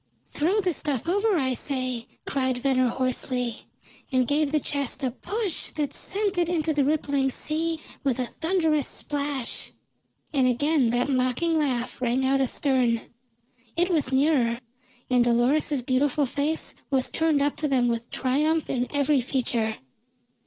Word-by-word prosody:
"Throw 350 Hz, +8 st, +1 dB
the 365 Hz, -3 st, +1 dB
stuff 290 Hz, -2 st, -2 dB
over, 405 Hz, +3 st, +2 dB
I 260 Hz, -4 st, +1 dB
say!" 255 Hz, -3 st, -2 dB, 0.2 s
cried 260 Hz, -2 st, 0 dB
Venner 255 Hz, 0 st, +2 dB
hoarsely, 250 Hz, -1 st, -2 dB, 0.4 s
and 255 Hz, -2 st, +2 dB
gave 290 Hz, 0 st, +1 dB
the 305 Hz, -, +2 dB
chest 280 Hz, -1 st, -2 dB
a 255 Hz, -, +1 dB
push 405 Hz, -, -3 dB
that 295 Hz, -2 st, -2 dB
sent 400 Hz, -1 st, -1 dB
it 345 Hz, -1 st, +1 dB
into 320 Hz, -2 st, 0 dB
the 290 Hz, -1 st, +2 dB
rippling 280 Hz, -2 st, +1 dB
sea 320 Hz, +4 st, -1 dB, 0.2 s
with 265 Hz, -3 st, +1 dB
a 255 Hz, -, 0 dB
thunderous 320 Hz, 0 st, 0 dB
splash. 285 Hz, -4 st, -3 dB, 0.6 s
And 265 Hz, -3 st, +3 dB
again 270 Hz, +1 st, +2 dB
that 245 Hz, +2 st, +1 dB
mocking 270 Hz, +5 st, +1 dB
laugh 250 Hz, -5 st, -1 dB
rang 255 Hz, +2 st, +1 dB
out 270 Hz, +1 st, +2 dB
astern; 255 Hz, -3 st, +1 dB, 0.8 s
it 355 Hz, +2 st, +2 dB
was 310 Hz, -6 st, +1 dB
nearer, 265 Hz, -4 st, +2 dB, 0.5 s
and 250 Hz, -1 st, +5 dB
Dolores's 250 Hz, +4 st, +2 dB
beautiful 275 Hz, +3 st, +1 dB
face 290 Hz, +5 st, -1 dB, 0.2 s
was 265 Hz, -3 st, +1 dB
turned 320 Hz, -3 st, +2 dB
up 290 Hz, -, 0 dB
to 305 Hz, -, 0 dB
them 255 Hz, -3 st, +2 dB
with 235 Hz, 0 st, -2 dB
triumph 300 Hz, +5 st, 0 dB
in 250 Hz, -1 st, 0 dB
every 285 Hz, -1 st, +2 dB
feature. 235 Hz, -3 st, 0 dB
275 Hz, 150 wpm, -26 LUFS, 255-310 Hz, 0.8 s, and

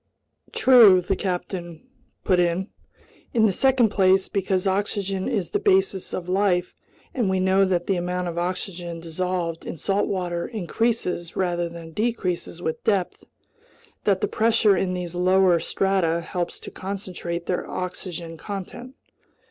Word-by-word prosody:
"True," 230 Hz, -8 st, +7 dB
the 185 Hz, +2 st, -1 dB
captain 175 Hz, -3 st, -4 dB, 0.4 s
put 185 Hz, -2 st, +3 dB
in. 175 Hz, +3 st, +1 dB, 0.7 s
"In 220 Hz, -1 st, +5 dB
the 200 Hz, -, +3 dB
second 260 Hz, 0 st, +3 dB
place, 190 Hz, -1 st, +3 dB
because 190 Hz, -1 st, 0 dB
oxygen 195 Hz, 0 st, -1 dB
is 190 Hz, -6 st, -2 dB
the -, -, +1 dB
basis 190 Hz, 0 st, +2 dB
of 180 Hz, -1 st, -4 dB
life, 185 Hz, -1 st, +1 dB, 0.4 s
and 235 Hz, -7 st, 0 dB
we 190 Hz, 0 st, +1 dB
know 190 Hz, +1 st, +3 dB
that 180 Hz, -2 st, 0 dB
the 195 Hz, -, 0 dB
amount 180 Hz, +1 st, -2 dB
of 170 Hz, -, -4 dB
oxygen 175 Hz, -1 st, -4 dB
dissolved 170 Hz, 0 st, -3 dB
in -, -, -6 dB
salt 195 Hz, +5 st, 0 dB
water 175 Hz, -3 st, -2 dB
increases 215 Hz, -4 st, -2 dB
rather 175 Hz, -2 st, 0 dB
than 165 Hz, -1 st, -10 dB
decreases 185 Hz, -5 st, -2 dB
with 160 Hz, -, -3 dB
depth, 195 Hz, -5 st, 0 dB, 0.8 s
that 195 Hz, -2 st, +2 dB
the -, -, +1 dB
pressure 220 Hz, -2 st, +3 dB
in 185 Hz, 0 st, -1 dB
these 180 Hz, -1 st, -5 dB
lower 180 Hz, 0 st, +4 dB
strata 170 Hz, -1 st, 0 dB
helps 175 Hz, 0 st, -4 dB
to -, -, -8 dB
concentrate 185 Hz, -3 st, -5 dB
their 180 Hz, -, -2 dB
oxygen 175 Hz, -2 st, -5 dB
content." 205 Hz, -, -7 dB
185 Hz, 145 wpm, -24 LUFS, 175-195 Hz, 0.8 s, True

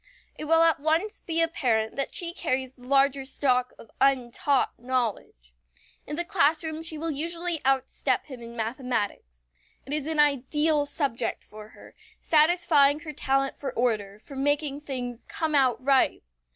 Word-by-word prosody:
It -, -, -7 dB
will 325 Hz, +1 st, +5 dB
at 330 Hz, -1 st, +4 dB
once 320 Hz, +8 st, 0 dB
be 330 Hz, 0 st, +1 dB
apparent 230 Hz, -9 st, 0 dB
that 275 Hz, -, -3 dB
she 340 Hz, -1 st, +1 dB
carries 260 Hz, -6 st, -2 dB
the 250 Hz, -1 st, -15 dB
larger 275 Hz, 0 st, +3 dB
stock 255 Hz, -2 st, 0 dB
of 225 Hz, -, -15 dB
untaught 270 Hz, 0 st, +2 dB
knowledge. 230 Hz, -, -3 dB, 0.5 s
In 295 Hz, -, -4 dB
the 345 Hz, +2 st, -1 dB
classroom 320 Hz, -2 st, +1 dB
she 325 Hz, -1 st, -1 dB
will 325 Hz, +1 st, -2 dB
usually 335 Hz, +3 st, -1 dB
outstep 265 Hz, 0 st, 0 dB
him 260 Hz, -4 st, -10 dB
in 235 Hz, 0 st, -10 dB
mathematics. 220 Hz, -, -4 dB, 0.4 s
It 275 Hz, -, -5 dB
is 300 Hz, -1 st, -2 dB
an 320 Hz, -1 st, -2 dB
ideal 295 Hz, +1 st, +2 dB
subject 265 Hz, -6 st, -2 dB
for 210 Hz, 0 st, -12 dB
her, -, -, -16 dB, 0.3 s
satisfying 305 Hz, -2 st, +3 dB
her 310 Hz, -2 st, -7 dB
talent 270 Hz, -1 st, -1 dB
for 280 Hz, -, -4 dB
order, 215 Hz, -5 st, -1 dB
for 275 Hz, +6 st, -12 dB
making 290 Hz, +1 st, 0 dB
things 250 Hz, -4 st, -6 dB
"come 320 Hz, -2 st, -2 dB
out 260 Hz, -5 st, +3 dB
right." 275 Hz, -2 st, +3 dB
275 Hz, 155 wpm, -26 LUFS, 250-310 Hz, 0.5 s, will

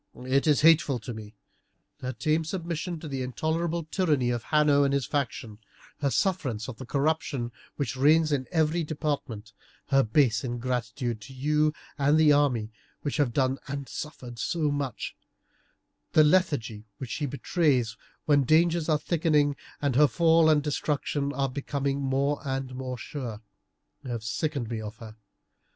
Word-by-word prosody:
It 135 Hz, +4 st, +2 dB
is 150 Hz, -2 st, +4 dB
hateful 155 Hz, -4 st, +5 dB
to 120 Hz, +1 st, -7 dB
me. 110 Hz, -1 st, -10 dB, 0.6 s
Her 130 Hz, -, -3 dB
tame 155 Hz, +7 st, 0 dB
submission 170 Hz, 0 st, -4 dB
to 160 Hz, -, -6 dB
the 135 Hz, -2 st, -3 dB
intolerable 160 Hz, +6 st, -1 dB
tyranny 150 Hz, -7 st, +1 dB
of 120 Hz, -2 st, -3 dB
Hanno 150 Hz, -2 st, +4 dB
and 140 Hz, 0 st, +2 dB
his 140 Hz, -3 st, 0 dB
faction, 115 Hz, -6 st, -3 dB, 0.4 s
her 140 Hz, -, +1 dB
sufferance 130 Hz, -, 0 dB
of 125 Hz, -4 st, -7 dB
the 130 Hz, -, -9 dB
corruption 140 Hz, -4 st, -1 dB, 0.2 s
which 135 Hz, -2 st, -2 dB
reigns 155 Hz, +4 st, +4 dB
in 135 Hz, -3 st, 0 dB
every 160 Hz, 0 st, +2 dB
department, 145 Hz, -9 st, -4 dB, 0.4 s
her 135 Hz, 0 st, +5 dB
base 115 Hz, -1 st, +2 dB
ingratitude 120 Hz, -1 st, -3 dB
to 105 Hz, -, -11 dB
you 150 Hz, +3 st, +1 dB, 0.2 s
and 145 Hz, +2 st, +4 dB
the 155 Hz, -2 st, +6 dB
army 125 Hz, -7 st, +2 dB, 0.3 s
which 145 Hz, -, -2 dB
have 145 Hz, -5 st, +2 dB
done 130 Hz, +2 st, +1 dB
and 140 Hz, 0 st, -4 dB
suffered 125 Hz, -6 st, -7 dB
so 155 Hz, -4 st, 0 dB
much, 140 Hz, -3 st, -3 dB, 1.0 s
the 155 Hz, -, +7 dB
lethargy 145 Hz, -, +1 dB
which 130 Hz, -4 st, -7 dB
she 150 Hz, -, -2 dB
betrays 135 Hz, -5 st, +1 dB, 0.3 s
when 145 Hz, -2 st, +4 dB
dangers 165 Hz, +3 st, +3 dB
are 155 Hz, -, +4 dB
thickening 150 Hz, -2 st, +1 dB, 0.3 s
and 140 Hz, -3 st, +1 dB
her 150 Hz, +2 st, +6 dB
fall 165 Hz, +3 st, +4 dB
and 150 Hz, -2 st, +4 dB
destruction 145 Hz, -1 st, -1 dB
are 140 Hz, -1 st, 0 dB
becoming 140 Hz, +1 st, -2 dB
more 140 Hz, +2 st, 0 dB
and 135 Hz, -2 st, -3 dB
more 130 Hz, -1 st, -5 dB
sure, 120 Hz, -3 st, -6 dB, 0.6 s
have 120 Hz, -4 st, -4 dB
sickened 135 Hz, +3 st, -2 dB
me 115 Hz, -1 st, -4 dB
of 105 Hz, +1 st, -7 dB
her. 110 Hz, -1 st, -10 dB
140 Hz, 155 wpm, -27 LUFS, 125-155 Hz, 1.0 s, the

